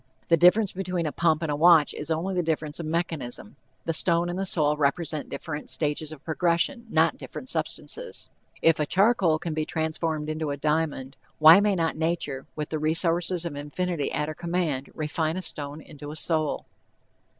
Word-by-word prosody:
The 165 - +6
difference 180 +5 +5
between 180 -2 -3
a 150 - -1
pump 165 0 +1
and 155 - -1
a - - 0
watch 160 -1 +5
is 150 - -6
only 180 +4 -1
a - - +3
difference 155 -2 -2
of 165 - -4
mechanism. 160 -9 -3 0.3
The 165 - 0
stone 170 +1 +2
and 180 - -4
the 195 - 0
soul 150 -4 +3
represent 150 +1 -1
different 150 -2 -6
stages 150 0 -1
of 155 -3 -11
progression, 175 - 0
not - - +2
different - - -8
substances. - - -4 0.3
If 165 -1 +4
a 150 - 0
charcoal 190 -4 +3
can 165 0 -4
be 155 0 -1
transformed 160 -1 -2
into 155 0 -3
a 140 - -3
diamond, 150 -3 -1 0.2
why 160 +4 +9
may 205 -1 +2
not 165 -2 0
nature, 160 -4 -2
with 150 -1 -4
the 155 - -2
resources 165 +3 +1
of 165 -4 -4
infinity 150 +2 -3
at 150 - -1
her 155 - -4
command, 170 -5 -2
refine 155 +2 -1
a 185 - -4
stone 145 -2 -3
into 145 -1 -10
a 150 - -7
soul? 155 0 0
160 Hz, 185 wpm, -26 LUFS, 150-175 Hz, 0.3 s, why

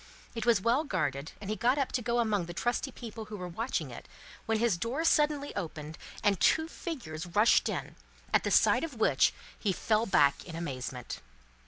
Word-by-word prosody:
It 230 -1 -4
was 230 -3 +5
well 235 +8 +2
guarded, 155 - -2
and 205 - -8
he 215 - -1
got 245 +6 +2
up 275 -2 0
to 250 - -1
go 240 0 0
among 210 -7 +1
the 175 - -7
trusty 245 +5 -1
people 225 -3 -8
who 215 0 -7
were 180 -1 -5
watching 225 +9 -3
it, - - -10 0.4
when 225 0 +2
his 230 -3 +2
door 240 - -2
suddenly 295 -2 +2
opened, 155 -4 -5 0.2
and 205 -3 +3
two 315 0 +3
figures 180 - -6
rushed 210 +6 +4
in, - - -4 0.4
at - - +3
sight - - +5
of 315 -5 -4
which 220 - +3 0.3
he 205 - +1
fell 215 +5 +1
back 140 -6 +3
in 170 - -9
amazement. 130 -6 -5
215 Hz, 190 wpm, -30 LUFS, 170-245 Hz, 0.4 s, was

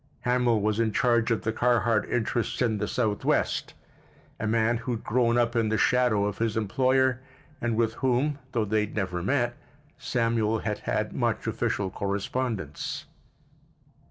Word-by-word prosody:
Hamil 125 -3 +2
was 105 +1 0
in 115 -1 +2
charge 120 +1 +2
of 115 - 0
the 110 - -1
Carhart 115 -2 +2
interests 120 0 -1
in 110 -4 +1
the 105 - -1
Southwest, 110 -4 0 0.6
a 110 - -2
man 115 +1 +2
who 120 +2 -3
had 115 - -5
grown 120 +1 +2
up 120 0 +1
in 115 -2 +2
the 110 - +1
shadow 125 -5 +3
of 105 -1 -3
his 115 -1 0
employer, 130 +4 +2 0.4
and 120 -1 0
with 115 0 +1
whom, 135 +3 0
though 115 -3 +1
they 110 +1 +1
had 105 0 -3
never 90 -4 -2
met, 120 +4 0 0.4
Samuel 115 -2 +1
had 105 -1 -3
had - - -2
much - - -1
official 95 -2 -1
correspondence. 100 - -3
115 Hz, 155 wpm, -27 LUFS, 105-120 Hz, 0.6 s, shadow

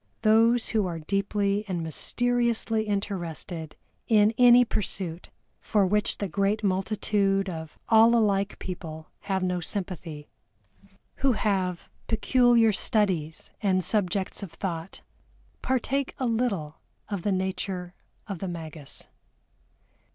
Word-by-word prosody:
Those 225 +2 +4
who 215 -4 +1
are 170 -2 -4
deeply 200 +4 0
and 175 -3 -2
mysteriously 235 - +1
interested 175 -5 -4 0.3
in 215 -1 +4
any 245 +1 +7
pursuit 185 -6 -3 0.3
for 205 -3 +2
which 210 +3 +1
the 200 - -2
great 200 +4 0
multitude 195 0 +1
of 160 -3 -7
all 225 +1 +6
alike 200 -3 +1
people 160 -4 -7
have 190 -2 -2
no 180 -1 0
sympathy, 170 -5 -4 0.9
who 270 -2 +3
have 190 -5 -1 0.2
peculiar 235 0 +4
studies 190 -8 0
and 185 -3 +2
subjects 195 -1 0
of 195 -5 -7
thought, 165 0 -5 0.6
partake 260 +1 -1
a 260 - -2
little 220 -10 -1 0.3
of 200 -4 -3
the 205 - 0
nature 185 -1 -3 0.3
of 195 -4 -6
the 195 - -4
magus. 160 -4 -7
195 Hz, 115 wpm, -27 LUFS, 180-220 Hz, 0.9 s, any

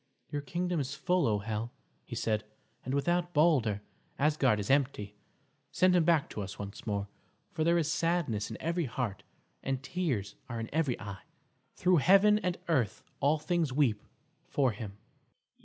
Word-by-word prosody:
"Your 145 -1 -2
kingdom 175 +4 -1
is 140 +1 -3
full, 180 -2 +2
O 105 -2 +2
Hel!" 110 +3 -3 0.3
he - - -7
said, 110 -1 0 0.4
"and 130 +3 -2
without 175 +4 0
Balder, 130 -10 +3 0.3
Asgard 140 -6 +3
is 100 +4 -1
empty. 130 -7 +1 0.6
Send 185 0 +4
him 170 -3 +4
back 165 -4 +3
to 105 - -4
us 100 0 -6
once 100 +2 -8
more, 100 -1 -1 0.4
for 155 - -1
there 170 +2 +4
is 160 -2 +1
sadness 165 -12 0
in 110 - -6
every 170 +1 0
heart 115 -5 -3 0.4
and 135 0 -2
tears 130 - -2 0.2
are 115 -2 -3
in 115 - -5
every 150 -6 +1
eye. 100 -1 -7 0.5
Through 180 -1 +3
heaven 195 +7 +6
and 180 -4 -1
earth 120 - +1 0.2
all 145 +3 +3
things 160 -1 0
weep 125 -7 +2 0.5
for 135 -4 +2
him." 105 -2 -7
140 Hz, 165 wpm, -31 LUFS, 110-170 Hz, 0.6 s, heaven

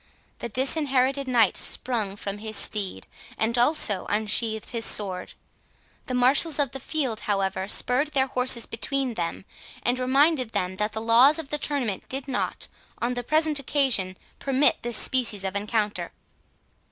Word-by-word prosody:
The 235 - -5
Disinherited 270 +1 +2
Knight 235 -6 +3
sprung 220 -6 -1
from 200 0 -6
his 215 0 -4
steed, 205 -3 -2 0.3
and 225 +1 0
also 240 - +1
unsheathed 220 +1 0
his 230 -2 -2
sword. 190 -5 -1 0.7
The 255 - -2
marshals 275 +5 +3
of 285 -4 0
the 270 - -6
field, 260 -6 -2
however, 195 -1 -1
spurred 250 +7 +3
their 275 -3 +1
horses 250 -2 +1
between 265 +2 -1
them, 175 -1 -4 0.4
and 245 +1 0
reminded 265 -1 +2
them, 185 +1 -2
that 210 +1 -2
the 220 - -3
laws 240 +7 +5
of 320 -4 -6
the 295 - 0
tournament 255 -11 -2
did 270 +1 -3
not, 265 - -2 0.3
on 240 +1 -1
the 245 - -3
present 310 +3 +2
occasion, 255 -10 0 0.2
permit 275 +1 +2
this 240 -2 -3
species 235 -7 0
of 190 0 -3
encounter. 210 +1 -1
245 Hz, 150 wpm, -25 LUFS, 210-275 Hz, 0.7 s, laws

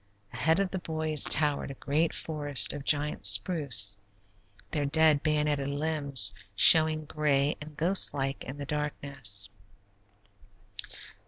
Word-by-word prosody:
Ahead 160 +1 -1
of 195 -2 -3
the 190 - -6
boys 155 -3 -2
towered 145 -1 -1
a 135 - -10
great 155 +5 -3
forest 145 -4 -1
of 145 - -9
giant 150 +1 -3
spruce, 100 - +3 0.8
their 150 -3 -3
dead 155 0 +1
bayoneted 150 -2 -3
limbs 140 -7 +2 0.2
showing 155 +7 +3
gray 145 -2 -2
and 150 0 -12
ghost 185 +5 +5
like 135 -1 -6
in 130 +2 -10
the 145 - -9
darkness. 140 -8 0
150 Hz, 120 wpm, -26 LUFS, 140-155 Hz, 0.8 s, ghost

